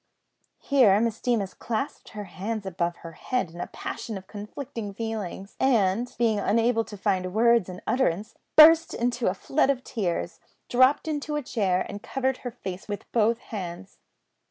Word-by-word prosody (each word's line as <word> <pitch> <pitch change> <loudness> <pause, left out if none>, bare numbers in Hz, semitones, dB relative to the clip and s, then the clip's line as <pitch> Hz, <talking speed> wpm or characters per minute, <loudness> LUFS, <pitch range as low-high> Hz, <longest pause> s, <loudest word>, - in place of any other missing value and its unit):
Here 240 -8 +4
Miss 230 -1 -1
Deemas 225 -6 0
clasped 235 +6 -4
her 210 -1 -6
hands 200 +3 -5
above 175 -2 -2
her 165 - -6
head 195 +2 -2
in 175 +1 -8
a - - -3
passion 220 -3 -6
of 190 - -10
conflicting 210 0 -7
feelings, 210 -3 -5
and, 230 -2 +2
being 225 -3 +2
unable 225 +3 +2
to 205 - -9
find 190 -2 0
words 235 -3 +4
for 180 0 -7
utterance, 215 -6 0 0.2
burst 325 +1 +8
into 240 0 0
a 185 - +1
flood 270 +8 +1
of 260 -2 0
tears, 180 -7 -3 0.3
dropped 255 +5 +4
into 300 -1 -2
a 295 - -2
chair, 195 -7 0
and 205 0 -7
covered 265 +1 -1
her 245 - -5
face 190 -6 -7
with 205 -1 -6
both 230 0 +3 0.2
hands. 185 -1 -6
220 Hz, 165 wpm, -26 LUFS, 190-245 Hz, 0.3 s, burst